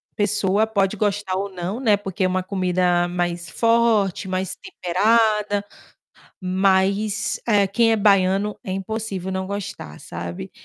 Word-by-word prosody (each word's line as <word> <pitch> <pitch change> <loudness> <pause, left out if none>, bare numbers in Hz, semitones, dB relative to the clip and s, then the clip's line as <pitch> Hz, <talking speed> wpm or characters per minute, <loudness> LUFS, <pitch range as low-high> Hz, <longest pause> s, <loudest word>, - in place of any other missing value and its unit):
pessoa 205 0 +1
pode 200 -1 0
gostar 205 -2 -1
ou 200 +1 -2
não, 185 +4 -4
né, 225 -6 +4
porque 195 -1 -4
é - - +3
uma 185 0 -1
comida 180 -2 +1
mais 175 -1 -3
forte, 225 -3 +2
mais 185 0 -2
temperada, 210 - +1 0.8
mas, 195 +2 +1
eh, 205 -3 +4
quem 225 +4 +2
é - - +4
baiano 200 0 +2
é 185 - -5
impossível 195 -1 -4
não 190 0 -2
gostar, 200 - -6
sabe, 85 -5 -7
195 Hz, 135 wpm, -22 LUFS, 185-210 Hz, 0.8 s, né